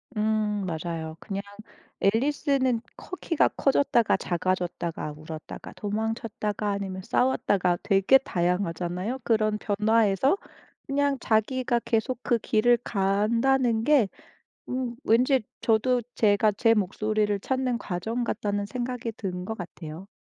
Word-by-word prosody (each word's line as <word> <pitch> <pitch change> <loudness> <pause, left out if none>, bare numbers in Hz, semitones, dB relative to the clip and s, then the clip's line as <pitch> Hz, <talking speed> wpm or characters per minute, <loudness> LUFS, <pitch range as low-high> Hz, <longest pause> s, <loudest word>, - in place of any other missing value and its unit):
음 210 -1 0
맞아요. 160 -2 -4
그냥 200 -1 -5 0.6
앨리스는 260 +2 +2 0.2
커 365 - -8
키가 330 -3 +2
커졌다가 270 -4 +2
작아졌다가 175 -3 -2
울었다가 155 0 -9
도망쳤다가 210 -1 -2
아니면 195 -2 -3
싸웠다가 190 -6 +1
되게 195 +6 +5
다양하잖아요. 180 +3 -2
그런 215 -2 +2
변화에서 215 - +2 0.5
그냥 280 0 +1
자기가 240 +2 +1
계속 235 +2 0
그 240 - +2
길을 235 +2 +3
간다는 225 +4 +2
게 275 -9 +4 0.6
음 250 -2 -3
왠지 250 +3 +3 0.2
저도 240 +3 +2
제가 210 0 +3
제 225 +3 +3
목소리를 210 0 0
찾는 260 +1 -1
과정 225 +4 -3
같다는 205 -2 -2
생각이 240 +2 -4
든 180 -3 -4
것 220 +1 -5
같아요. 170 0 -8
215 Hz, 275 characters per minute, -26 LUFS, 195-245 Hz, 0.6 s, 되게